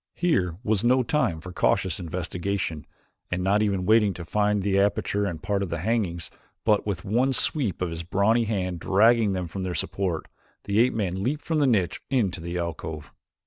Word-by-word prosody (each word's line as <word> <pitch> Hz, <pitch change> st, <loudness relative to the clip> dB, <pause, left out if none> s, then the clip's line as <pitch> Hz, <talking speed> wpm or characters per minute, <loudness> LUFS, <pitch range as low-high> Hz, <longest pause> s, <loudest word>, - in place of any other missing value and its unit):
Here 95 Hz, -, +1 dB
was 110 Hz, -2 st, +1 dB
no 125 Hz, +2 st, +4 dB
time 115 Hz, -, 0 dB
for 90 Hz, +1 st, -9 dB
cautious 95 Hz, +1 st, +1 dB
investigation 90 Hz, -1 st, -3 dB, 0.4 s
and, 90 Hz, 0 st, -2 dB
not 100 Hz, +3 st, +3 dB
even 100 Hz, -3 st, 0 dB
waiting 105 Hz, -1 st, +4 dB
to 85 Hz, -, -7 dB
find 105 Hz, +2 st, +1 dB
the 100 Hz, 0 st, +2 dB
aperture 100 Hz, 0 st, +1 dB
and 80 Hz, -5 st, -5 dB
part 100 Hz, -3 st, -1 dB
the 85 Hz, -, -2 dB
hangings, 90 Hz, -3 st, -1 dB, 0.3 s
but 105 Hz, -1 st, +2 dB
with 95 Hz, -4 st, -3 dB
one 125 Hz, +7 st, +2 dB
sweep 120 Hz, -, 0 dB
of 85 Hz, -, -2 dB
a 85 Hz, 0 st, -5 dB
brawny 105 Hz, +7 st, +2 dB
hand 90 Hz, -5 st, -2 dB
dragging 110 Hz, +2 st, +4 dB
them 90 Hz, -2 st, -3 dB
from 95 Hz, +4 st, -6 dB
their 90 Hz, -1 st, -3 dB
support, 85 Hz, +1 st, -2 dB, 0.4 s
the 100 Hz, +1 st, 0 dB
ape 125 Hz, +2 st, +3 dB
man 95 Hz, -4 st, -1 dB
leaped 140 Hz, +8 st, -1 dB
from 160 Hz, -2 st, 0 dB
the 145 Hz, -, +3 dB
niche 100 Hz, -8 st, +1 dB
into 100 Hz, -10 st, 0 dB
the 85 Hz, +1 st, -4 dB
alcove. 80 Hz, -2 st, -5 dB
100 Hz, 185 wpm, -25 LUFS, 90-110 Hz, 0.4 s, no